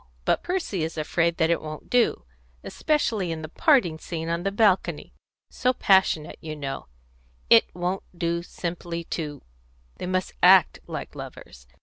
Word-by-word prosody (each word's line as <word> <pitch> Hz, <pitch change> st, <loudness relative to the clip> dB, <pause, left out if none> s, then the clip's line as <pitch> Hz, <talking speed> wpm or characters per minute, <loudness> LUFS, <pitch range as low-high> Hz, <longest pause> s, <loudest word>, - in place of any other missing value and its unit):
But -, -, +2 dB
Percy 345 Hz, -, -2 dB
is 160 Hz, +1 st, -4 dB
afraid 170 Hz, +2 st, 0 dB
that 160 Hz, -1 st, +2 dB
it 170 Hz, -, +1 dB
won't 155 Hz, -1 st, -8 dB
do, 240 Hz, -, +2 dB, 0.4 s
especially 230 Hz, -, 0 dB
in 160 Hz, -1 st, -5 dB
the -, -, -4 dB
parting 180 Hz, -, +2 dB
scene 165 Hz, -1 st, -5 dB
on 170 Hz, +1 st, -1 dB
the 195 Hz, +2 st, -1 dB
balcony 200 Hz, -2 st, +1 dB, 0.4 s
so 255 Hz, 0 st, +1 dB
passionate, 190 Hz, -9 st, +2 dB
you 155 Hz, -1 st, -6 dB
know 140 Hz, -, -5 dB, 0.6 s
it 230 Hz, -, +8 dB
won't 180 Hz, +2 st, -2 dB, 0.2 s
do 170 Hz, 0 st, -1 dB
simply 170 Hz, -1 st, -5 dB
to 150 Hz, -4 st, -5 dB, 0.5 s
They -, -, -5 dB
must 185 Hz, 0 st, -1 dB
act 185 Hz, -1 st, +6 dB
like -, -, -6 dB
lovers. -, -, -10 dB
170 Hz, 150 wpm, -25 LUFS, 160-195 Hz, 0.6 s, it